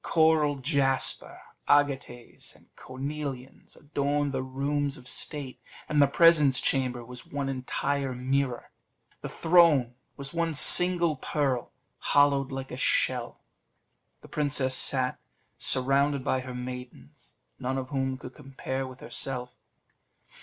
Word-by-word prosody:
Coral 160 Hz, -2 st, +2 dB
jasper, 135 Hz, -1 st, 0 dB, 0.3 s
agates, 140 Hz, -4 st, -1 dB
and -, -, -26 dB
cornelians 135 Hz, 0 st, -8 dB
adorned 145 Hz, 0 st, -2 dB
the 130 Hz, -1 st, -3 dB
rooms 140 Hz, +2 st, -3 dB
of 125 Hz, -, -14 dB
state, 130 Hz, -3 st, -5 dB, 0.3 s
and 150 Hz, -1 st, +1 dB
the 140 Hz, -, +5 dB
presence 150 Hz, -3 st, +4 dB
chamber 125 Hz, -3 st, -2 dB
was 125 Hz, 0 st, -12 dB
one 140 Hz, -1 st, -4 dB
entire 135 Hz, +1 st, -3 dB
mirror. 130 Hz, 0 st, -3 dB, 0.5 s
The -, -, -6 dB
throne 160 Hz, -8 st, +3 dB, 0.2 s
was 140 Hz, +1 st, -9 dB
one 165 Hz, -1 st, -2 dB
single 175 Hz, 0 st, +8 dB
pearl, 135 Hz, -3 st, -2 dB, 0.3 s
hollowed 140 Hz, -1 st, +1 dB
like 135 Hz, 0 st, -7 dB
a 125 Hz, -, -7 dB
shell; -, -, 0 dB, 0.8 s
the -, -, -15 dB
princess 140 Hz, -3 st, -1 dB
sat, 130 Hz, -1 st, +2 dB, 0.4 s
surrounded 135 Hz, +1 st, 0 dB
by 130 Hz, -, -1 dB
her 130 Hz, -1 st, -8 dB
maidens, 125 Hz, -, -10 dB, 0.2 s
none 130 Hz, +1 st, -3 dB
of 130 Hz, -1 st, -5 dB
whom 135 Hz, -2 st, -3 dB
could 125 Hz, 0 st, -11 dB
compare 135 Hz, -2 st, -6 dB
with 130 Hz, -1 st, -13 dB
herself. 125 Hz, -2 st, -4 dB
135 Hz, 125 wpm, -26 LUFS, 130-145 Hz, 0.8 s, single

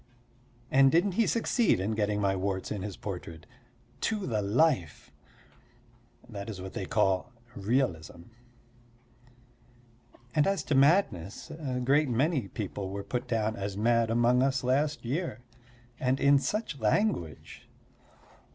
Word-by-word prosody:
And 135 Hz, 0 st, +6 dB
didn't 175 Hz, +5 st, +3 dB
he 225 Hz, +5 st, +1 dB
succeed 230 Hz, -, +2 dB
in 100 Hz, +4 st, -1 dB
getting 105 Hz, -1 st, 0 dB
my 100 Hz, -1 st, +1 dB
warts 95 Hz, 0 st, -3 dB
in 105 Hz, -, -3 dB
his 100 Hz, -1 st, -6 dB
portrait 85 Hz, -5 st, -7 dB, 0.6 s
to 210 Hz, -3 st, -1 dB
the 110 Hz, -4 st, -1 dB
life. 105 Hz, -, +1 dB, 1.2 s
That 100 Hz, -2 st, -7 dB
is 100 Hz, -4 st, -6 dB
what 95 Hz, 0 st, -7 dB
they -, -, -4 dB
call 95 Hz, +5 st, +1 dB, 0.2 s
realism. 100 Hz, -7 st, -1 dB, 2.1 s
And 150 Hz, +1 st, +3 dB
as 195 Hz, 0 st, 0 dB
to -, -, -2 dB
madness, 135 Hz, -, +2 dB
a 135 Hz, -5 st, -4 dB
great 145 Hz, +2 st, +3 dB
many 130 Hz, -, +1 dB
people 100 Hz, -1 st, -5 dB
were 100 Hz, +1 st, -5 dB
put 125 Hz, +3 st, -4 dB
down 110 Hz, -2 st, 0 dB
as 100 Hz, -2 st, -4 dB
mad 115 Hz, +1 st, +2 dB
among 120 Hz, +2 st, +3 dB
us 135 Hz, 0 st, +1 dB
last 140 Hz, +3 st, 0 dB
year. 140 Hz, +1 st, -3 dB, 0.6 s
And 130 Hz, +1 st, +1 dB
in 140 Hz, 0 st, +5 dB
such 205 Hz, -2 st, -3 dB
language! 105 Hz, -, -1 dB
120 Hz, 135 wpm, -29 LUFS, 100-140 Hz, 2.1 s, And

